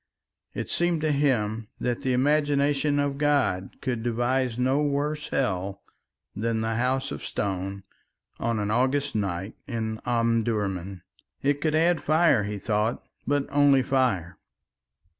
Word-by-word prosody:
It - - -4
seemed 175 -2 +1
to 155 -1 +1
him 115 -7 +1
that 120 +1 -1
the 130 -2 0
imagination 145 +1 +2
of 140 -1 0
God 140 -11 +1
could 125 -4 -2
devise 120 +1 0
no 130 +3 +2
worse 150 +1 -1
hell 100 -5 -2 0.5
than 110 +1 -1
the 110 0 -1
House 130 +2 0
of - - -6
Stone 95 0 -3 0.6
on 115 -1 0
an 105 0 -1
August 135 +4 +1
night 95 -1 -2
in 110 -4 -3
Omdurman. 110 -6 0 0.4
It 145 +1 +1
could 155 0 +1
add 165 0 +3
fire, 155 -8 +3
he 105 0 -3
thought, 105 +3 -1 0.2
but 145 0 +1
only 140 -2 +5
fire. 125 -11 0
125 Hz, 135 wpm, -26 LUFS, 105-145 Hz, 0.6 s, only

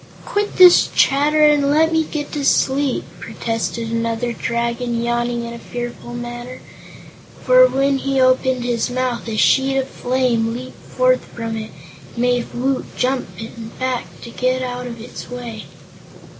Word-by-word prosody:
"Quit 410 0 -2
this 360 -1 +8
chatter 295 +3 +3
and 295 -2 +4
let 320 +3 +3
me 320 0 +3
get 300 -1 -5
to 290 - -3
sleep," 275 0 +2 0.2
protested 225 0 -3
another 230 +1 -1
Dragon, 235 +1 -2
yawning 240 0 -1
in 235 - -6
a 235 - -8
fearful 240 0 -7
manner, 240 +1 -7 0.8
for - - +7
when 275 - +1
he 275 0 0
opened 255 -1 +2
his 240 0 -1
mouth 250 -1 -2
a 220 -1 -3
sheet 270 +4 +3
of 265 -1 0
flame 245 -4 0
leaped 255 +1 -9
forth - - +2
from 230 -1 -5
it 215 -1 -5 0.5
and - - -17
made 245 0 +1
Woot 260 +2 -1
jump 255 0 0 0.5
back 255 -2 -2
to 235 - -9
get 255 +1 0
out 250 0 -4
of 235 -1 -8
its 230 - -9
way. 240 -3 -7
250 Hz, 155 wpm, -19 LUFS, 235-270 Hz, 0.8 s, this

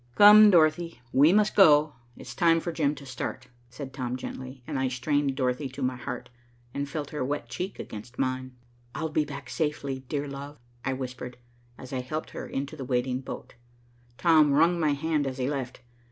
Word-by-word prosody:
"Come, 210 +1 +9
Dorothy, 165 -4 +3
we 145 +5 +6
must 210 +2 +3
go. 150 -5 +6 0.2
It's - - -9
time 165 -2 +4
for 170 - -4
Jim 150 -2 0
to 140 0 -11
start," 130 0 -5 0.2
said 130 +3 -8
Tom 125 -2 -3
gently, 130 0 -8
and 135 - -3
I 130 - +1
strained 135 +2 0
Dorothy 130 +1 -1
to 135 +1 -6
my 130 0 0
heart 125 0 -6 0.4
and 140 0 -3
felt 145 0 -5
her 150 -3 -2
wet 135 -3 -3
cheek 185 +9 -5
against 110 +3 -9
mine. 130 -1 -2 0.4
"I'll 160 +1 -2
be 155 0 +1
back 140 -1 -8
safely, 150 -4 -2
dear 145 -1 -2
love," 140 +1 -8 0.3
I 135 - -1
whispered, 125 -1 -6 0.4
as 130 0 -10
I 130 - -1
helped 155 +5 -5
her - - -6
into 140 +3 -4
the 140 - -6
waiting 125 0 -1
boat. 130 - -8 0.6
Tom 155 -4 +5
wrung 170 +4 +4
my 155 -3 +2
hand 150 0 0
as 130 0 -4
he 130 -1 -1
left. 135 -4 -4
140 Hz, 190 wpm, -27 LUFS, 130-155 Hz, 0.6 s, Come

